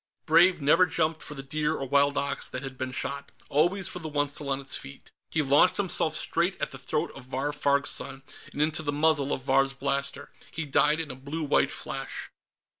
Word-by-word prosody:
_" - - -47
Brave 170 +3 +5
never 165 +6 +5
jumped 160 0 0
for 150 - -6
the 135 - -6
deer 150 +2 -1
or 135 - -4
wild 140 +1 +3
ox 140 0 -2
that 130 - -5
had 135 -1 -6
been 130 0 -4
shot; 140 +2 -4 0.2
always 175 +6 +2
for 180 - -5
the 160 - -5
one 145 -1 0
still 145 0 -4
on 135 0 0
its 135 -1 -3
feet. 70 - -9 0.2
He 160 - +1
launched 140 +6 +4
himself 175 -5 +1
straight 170 +4 0
at - - -2
the 130 - -8
throat 150 +5 -1
of 135 - -11
Vahr 135 +3 -2
Farg's 140 -1 +1
son 135 0 -4 0.3
and 145 - 0
into 155 0 0
the 145 -2 -2
muzzle 145 -1 +2
of 130 - -2
Vahr's 135 0 +2
blaster. 140 0 -2 0.2
He 160 -1 -4
died 150 +2 +3
in 160 -4 -4
a - - -8
blue 140 +5 -5
white 145 - +2
flash. - - -6
145 Hz, 220 wpm, -27 LUFS, 135-160 Hz, 0.3 s, Brave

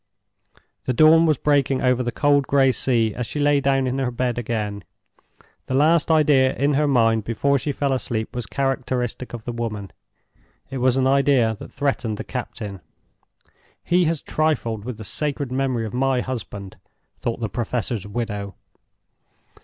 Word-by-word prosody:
The 130 - 0
dawn 160 +5 +6
was 155 -3 +3
breaking 140 -2 +1
over 125 -1 +3
the 120 -1 -2
cold 145 0 +2
gray 135 -2 +4
sea 115 -4 +1
as 125 +1 -4
she 150 - -4
lay 145 -1 +3
down 135 -1 +2
in 130 +1 -1
her 130 -2 0
bed 125 0 -1
again. 105 -4 -3 0.8
The 130 - -1
last 155 +3 +3
idea 145 -4 +4
in 140 +2 +1
her 150 +2 +2
mind 115 -5 +3
before 140 +6 +1
she 145 - -2
fell 140 -1 -1
asleep 120 -2 -3
was 120 -4 -4
characteristic 130 -2 -2
of 115 -2 -8
the 120 - -3
woman—it 115 +3 -9
was 130 +1 +2
an 130 - +2
idea 135 -4 +3
that - - -10
threatened 135 -6 -1
the - - -5
captain. 105 -6 -6 1.0
"He 175 0 +2
has 165 -2 -1
trifled 120 -9 -1
with 125 -3 -5
the 110 - -8
sacred 140 +4 -3
memory 130 -3 -1
of 110 - -6
my 130 0 +1
husband," 105 -7 -6 0.4
thought 115 0 -3
the 115 - -1
Professor's 115 -1 -3
widow. 105 -3 -4
130 Hz, 160 wpm, -22 LUFS, 115-140 Hz, 1.0 s, dawn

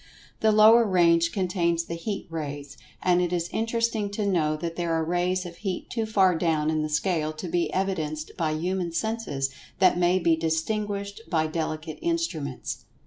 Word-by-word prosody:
The 220 - +4
lower 220 +2 +7
range 170 -4 +3
contains 175 -3 0
the 170 - -6
heat 195 +4 -4
rays, 145 -3 -5 0.3
and 180 -1 +3
it 175 -1 0
is 175 -1 -1
interesting 225 -2 0
to 210 0 -1
know 155 -6 +1
that 165 +1 -4
there 170 -1 -1
are 160 - +1
rays 180 +2 0
of 170 -1 -8
heat 190 -4 -4
too 225 -3 -1
far 195 -4 +4
down 160 -2 +1
in 155 -1 0
the 155 - -2
scale 155 0 0
to 155 +4 -6
be 175 0 0
evidenced 160 -5 -2
by 165 -4 0
human 175 +1 -2
senses 170 -10 -2 0.3
that 185 -2 +4
may 175 +1 +3
be 170 -3 +3
distinguished 200 +6 -2
by 160 -2 +2
delicate 155 0 -4
instruments. 255 - -3
175 Hz, 175 wpm, -26 LUFS, 160-200 Hz, 0.3 s, lower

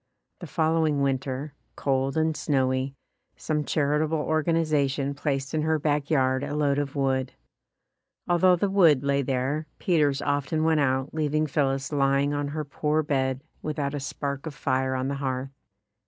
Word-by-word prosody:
The 175 - -8
following 160 -3 +1
winter, 135 +1 -2 0.2
cold 135 +1 0
and 160 0 +1
snowy, 130 -2 0 0.4
some 150 -1 -1
charitable 150 +2 +1
organization 150 -3 +1
placed 140 -2 -2
in 155 - +1
her 160 +1 +1
back 145 -1 0
yard 130 -3 +2
a 145 - -3
load 145 -1 +1
of 145 -1 -3
wood. 135 -2 0 0.9
Although 180 +1 +4
the 190 +4 0
wood 165 -9 +5
lay 140 0 +2
there, 135 +4 -1
Peters 150 -6 +2
often 145 +2 0
went 160 -1 +3
out, 135 -1 0
leaving 155 0 0
Phillis 135 -2 0
lying 140 0 +2
on 145 0 -1
her 150 +1 -4
poor 150 +2 0
bed 130 -2 -1 0.2
without 150 -2 -2
a 145 - -2
spark 140 +1 -4
of 150 - -7
fire 130 -1 0
on 130 0 -1
the 140 0 -2
hearth. 130 0 -2
145 Hz, 155 wpm, -26 LUFS, 135-155 Hz, 0.9 s, wood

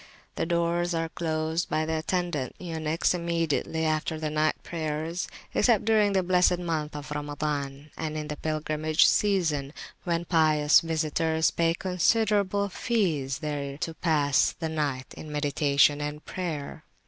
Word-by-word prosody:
The 165 - -2
doors 170 0 +1
are 165 0 -1
closed 160 0 -2
by 155 - 0
the 160 0 -1
attendant 170 -6 -2
eunuchs 160 -2 -1
immediately 165 -2 -1
after 155 0 -1
the 155 -1 -2
night 155 0 +2
prayers, 160 +1 -3 0.3
except 225 -5 +3
during 215 -2 +3
the 190 -1 +2
blessed 180 0 +3
month 160 -4 -3
Al 145 -1 -6
Ramazan 145 -1 -4
and 155 -1 -4
in 150 -1 -4
the 150 - -4
pilgrimage 155 +1 +1
season, 160 -9 +1 0.3
when 170 -1 -1
pious 155 -3 +4
visitors 160 0 0
pay 165 0 +1
considerable 200 +2 +1
fees 175 - -1
there 140 -2 -3
to 165 +2 -3
pass 150 -4 +2
the 160 -1 -3
night 145 -5 -2
in 155 - -9
meditation 145 0 +2
and 150 +1 -5
prayer. 160 -4 -5
160 Hz, 140 wpm, -27 LUFS, 150-175 Hz, 0.3 s, pious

